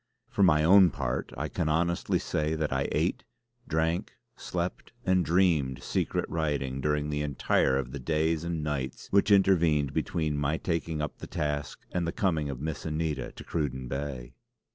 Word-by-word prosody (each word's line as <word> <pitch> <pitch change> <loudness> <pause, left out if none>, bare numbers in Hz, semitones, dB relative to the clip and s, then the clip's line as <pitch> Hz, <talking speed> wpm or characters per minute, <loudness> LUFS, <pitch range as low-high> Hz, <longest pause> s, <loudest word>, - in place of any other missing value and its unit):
For - - 0
my 75 -5 +5
own 95 +2 +7
part - - -3
I 75 +3 -2
can 80 0 -2
honestly 85 +2 +1
say 75 +1 -1
that 75 -3 -1
I 65 +1 0
ate, - - 0 0.4
drank, 80 +5 0 0.2
slept 90 +4 -4
and 95 -1 +3
dreamed 80 -8 +2
secret - - -1
writing 70 -5 -1
during 75 +1 0
the 75 0 -1
entire 70 -2 +2
of 65 -2 -3
the 70 - -5
days 80 +3 0
and 85 -2 -2
nights 70 -4 -3
which 100 +1 +4
intervened 85 -8 +4
between 75 -3 -1
my 75 +2 0
taking 80 -3 -2
up 75 - -5
the - - -7
task 75 -2 -3
and 85 -2 -1
the - - 0
coming 80 -7 0
of 65 -3 -5
Miss 75 +1 -4
Anita 80 -1 -2
to - - -10
Cruden 65 -5 -2
Bay. 65 -2 -5
75 Hz, 170 wpm, -29 LUFS, 70-85 Hz, 0.4 s, own